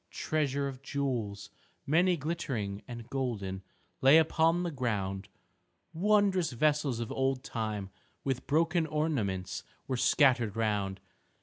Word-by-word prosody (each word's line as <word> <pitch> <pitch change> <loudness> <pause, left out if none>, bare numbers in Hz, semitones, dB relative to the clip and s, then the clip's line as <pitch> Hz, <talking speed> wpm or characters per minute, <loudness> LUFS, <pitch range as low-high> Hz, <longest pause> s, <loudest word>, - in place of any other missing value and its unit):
Treasure 140 -3 -1
of 135 -1 -7
jewels, 120 -8 -3 0.3
many 175 +4 +3
glittering 130 -11 -3
and 120 -2 -8
golden, 105 -8 -2 0.4
lay 135 +4 +8
upon 165 +2 +3
the 175 - -2
ground. 105 -7 -2 0.6
Wondrous 190 -3 +2
vessels 145 -1 +1
of 115 - -4
old 135 -1 0
time 105 -4 -4 0.3
with 135 -2 -2
broken 160 +2 +2
ornaments 135 - -1 0.2
were 130 - -1
scattered 120 -5 +3
round. 105 -4 -1
130 Hz, 115 wpm, -31 LUFS, 105-155 Hz, 0.6 s, lay